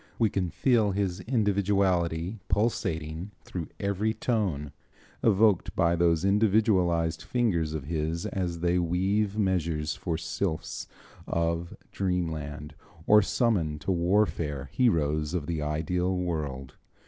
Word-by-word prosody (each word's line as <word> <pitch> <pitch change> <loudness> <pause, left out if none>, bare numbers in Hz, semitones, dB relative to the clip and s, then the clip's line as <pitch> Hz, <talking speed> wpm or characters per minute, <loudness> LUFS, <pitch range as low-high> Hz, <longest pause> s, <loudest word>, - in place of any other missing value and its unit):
We 110 -3 +2
can 90 -3 -1
feel 110 -2 +2
his 95 -2 -1
individuality 100 -5 +1
pulsating 85 -5 -1
through 85 -4 -5
every 100 +2 0
tone 95 - -1 0.5
evoked 105 -3 +3
by 85 -2 +3
those 85 0 +2
individualized 95 -5 +2
fingers 85 -11 0
of 75 - -4
his 80 +2 -2
as 85 -3 -3
they 90 +1 +2
weave 95 +4 0
measures 85 -6 0
for 85 -3 -3
sylphs 85 0 -3 0.4
of 85 +1 -1 0.2
dreamland, 80 -5 -3 0.3
or 105 0 +7
summon 95 - +1
to 75 +6 -2
warfare 85 -6 0
heroes 80 - +1
of 80 -5 -2
the 80 -1 -2
ideal 90 +5 -1
world. 75 -7 -3
90 Hz, 115 wpm, -28 LUFS, 80-100 Hz, 0.5 s, or